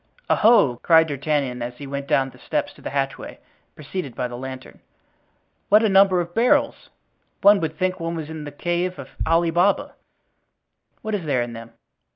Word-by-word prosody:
"Oho!" 210 - +4
cried 160 +4 +4
D'Artagnan, 140 -3 -2
as 120 +1 -5
he 145 - -8
went 140 0 -5
down 135 -1 +1
the - - -19
steps - - -3
of - - -18
the - - -4
hatchway, 135 -1 -4 0.4
preceded 150 -2 -6
by 125 - -2
the 120 - -8
lantern, 130 +1 -9 0.9
"what 210 +2 +6
a 220 - +3
number 195 -1 +5
of 175 0 -4
barrels! 235 +5 +1 0.5
one 200 0 +7
would 160 -2 -4
think 185 0 -1
one 165 0 -3
was 160 -2 -5
in 160 -1 -7
the 145 - -7
cave 175 +4 -2
of - - -9 0.2
Ali 165 0 +2
Baba. 180 +4 +1 1.1
What 220 - -4
is 195 -5 -2
there 130 -5 +1
in 120 -1 -7
them?" 115 0 -10
160 Hz, 185 wpm, -22 LUFS, 135-185 Hz, 1.1 s, one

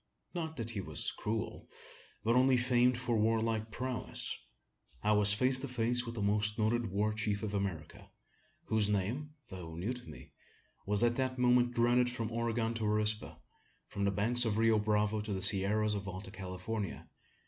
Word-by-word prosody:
Not 160 -3 -4
that 115 -1 -4
he 105 -4 -4
was 80 -5 -3
cruel, 110 +1 -4 0.5
but 115 +2 +2
only 130 0 +4
famed 125 0 +3
for 125 -2 -1
warlike 110 0 0
prowess. 125 +2 -2 0.7
I 105 - +2
was 105 -1 +6
face 130 +3 +3
to 140 - -4
face 120 0 +1
with 115 - -6
the 105 - -3
most 105 +1 +1
noted 115 +1 +1
war 105 +3 0
chief 105 -1 -2
of 105 -1 -3
America: 95 -6 -4 0.6
whose 110 -2 +1
name, 120 +10 -2
though 85 -3 -8
new 95 +9 -3
to 125 -1 -9
me, - - -12 0.6
was 105 +2 +4
at 120 0 +2
that 130 -1 -1
moment 125 0 +3
dreaded 120 +1 +3
from 115 -2 -4
Oregon 115 0 -1
to 115 -1 -4
Arispe, 105 0 +1 0.5
from 100 - -4
the - - +3
banks 110 +5 +3
of 110 -3 0
the 110 - +1
Rio 115 -1 +4
Bravo 105 0 0
to 105 -1 -4
the 95 - -3
sierras 105 +2 +2
of 100 -1 -4
Alta 95 0 -6
California. 95 +1 -5
110 Hz, 180 wpm, -33 LUFS, 105-120 Hz, 0.7 s, was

